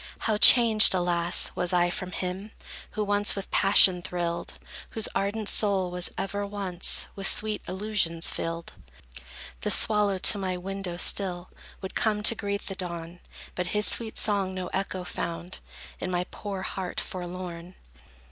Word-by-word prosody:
How 220 -2 0
changed, 225 -5 +7
alas, 175 -1 0
was 180 - -2
I 175 -1 +2
from 185 0 -4
him 185 +4 -5 0.4
Who 215 - -2
once 205 0 0
with 195 -1 -7
passion 195 -2 +5
thrilled, 170 -1 -4 0.3
Whose 220 -2 -1
ardent 205 +2 -2
soul 195 -4 +3
was 180 0 0
ever, 200 +1 -3
once, 195 -3 +4
With 195 -1 -2
sweet 215 -1 +1
illusions 185 -4 0
filled! 165 0 -5 0.9
The - - -2
swallow 210 -2 +2
to 195 - +5
my 185 -2 -3
window, 190 -1 -6
still, 180 -1 +1 0.3
Would 190 - -7
come, 210 -2 -1
to 230 - +6
greet 200 -2 -4
the 195 - -6
dawn; 170 -2 -7 0.3
But 180 -1 -4
his 210 - +3
sweet 225 -2 +1
song 195 -3 +1
no 185 -1 -5
echo 190 -1 -3
found 175 0 -5 0.4
In 185 - -4
my 180 -1 -1
poor 195 -2 -6
heart, 185 -1 -5
forlorn. 180 -1 -7
190 Hz, 150 wpm, -26 LUFS, 180-205 Hz, 0.9 s, changed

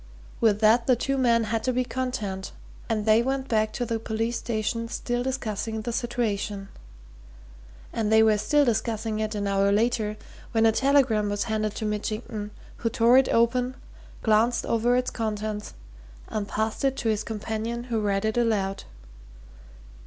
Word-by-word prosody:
With 210 -2 +3
that 225 +2 +4
the 255 - +5
two 275 +3 -1
men 235 -3 +3
had 220 0 -2
to 255 - +1
be 255 0 +1
content, 215 -7 -4 0.4
and 215 -2 0
they 220 +1 +5
went 265 +2 -2
back 215 -2 +1
to 245 - -2
the 230 -1 -2
police 225 +2 -2
station 230 0 -2
still 240 +1 -2
discussing 225 -4 -3
the 235 +1 -3
situation. 215 -5 -2 1.2
And 220 -2 -1
they 220 0 +6
were 215 -1 +4
still 290 +6 +3
discussing 220 -2 -1
it 215 0 -2
an 205 -1 -2
hour 200 0 +2
later 215 0 +1 0.4
when 225 -1 +3
a 225 - +6
telegram 250 -5 +3
was 205 0 -1
handed 215 -1 -2
to 220 - -3
Mitchington, 210 0 -3 0.3
who 230 - -1
tore 235 +3 +5
it 265 - +1
open, 245 +2 +2 0.5
glanced 225 +2 +3
over 235 +2 +2
its 250 0 0
contents 215 -1 -4 0.5
and 215 -2 -3
passed 220 +4 -2
it 270 -1 +1
to 225 - -1
his 215 0 0
companion 220 +2 -4
who 235 -3 -2
read 200 0 0
it 220 +2 0
aloud. 205 -5 0
225 Hz, 165 wpm, -26 LUFS, 215-240 Hz, 1.2 s, they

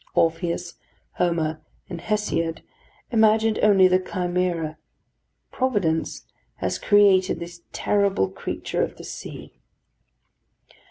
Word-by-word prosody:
Orpheus, 170 +1 0 0.4
Homer, 160 -3 0 0.3
and 170 -3 -7
Hesiod 190 -6 -1 0.5
imagined 220 -1 +3
only 195 -3 +6
the 185 0 +3
Chimera: 180 -4 -2 0.7
Providence 200 -11 -1 0.3
has - - -2
created 200 -3 +4
this 170 0 -9
terrible 200 - +1
creature 95 - -4
of - - -2
the - - -10
sea. - - -9
180 Hz, 95 wpm, -24 LUFS, 165-205 Hz, 0.7 s, only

